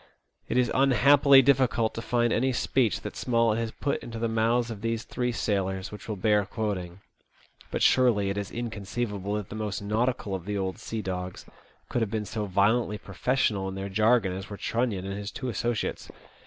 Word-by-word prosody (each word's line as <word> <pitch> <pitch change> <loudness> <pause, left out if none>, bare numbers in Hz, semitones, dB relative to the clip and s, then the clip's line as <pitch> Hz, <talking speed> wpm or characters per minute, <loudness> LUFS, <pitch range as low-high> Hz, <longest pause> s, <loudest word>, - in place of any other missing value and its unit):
It - - 0
is 125 -2 +3
unhappily 135 +1 +6
difficult 125 -4 +3
to 115 - -5
find 120 0 +1
any 130 +3 +1
speech 120 -2 +1
that - - -7
Smollett 115 -2 +1
has 115 -1 -1
put 140 +5 -2
into 115 -1 -7
the 115 +1 0
mouths 115 +1 +1
of 105 -3 -7
these 115 0 -1
three 125 -1 -2
sailors 95 -4 -1
which 105 +2 -10
will 110 - -1
bear 105 +1 +2
quoting; 100 -3 -4 0.7
but - - -1
surely 110 -6 +4
it - - -3
is 100 - -5
inconceivable 105 -3 -3
that 105 -3 -4
the - - -7
most 105 -2 -3
nautical 110 0 -1
of 95 -3 -4
the 105 0 -2
'old 95 +1 -3
sea 115 -1 -5
dogs 90 -1 -5 0.4
could 120 - -1
have 110 - 0
been 105 0 -2
so 105 +1 -3
Violently 105 +3 +2
professional 100 -1 0
in 95 - -6
their 95 +1 -4
jargon 110 -1 +3
as 95 0 -6
were 100 - -7
Trunnion 115 -6 -1
and 95 0 -4
his 100 0 -5
two 130 +1 -5
associates. 120 0 -2
110 Hz, 195 wpm, -27 LUFS, 100-120 Hz, 0.7 s, unhappily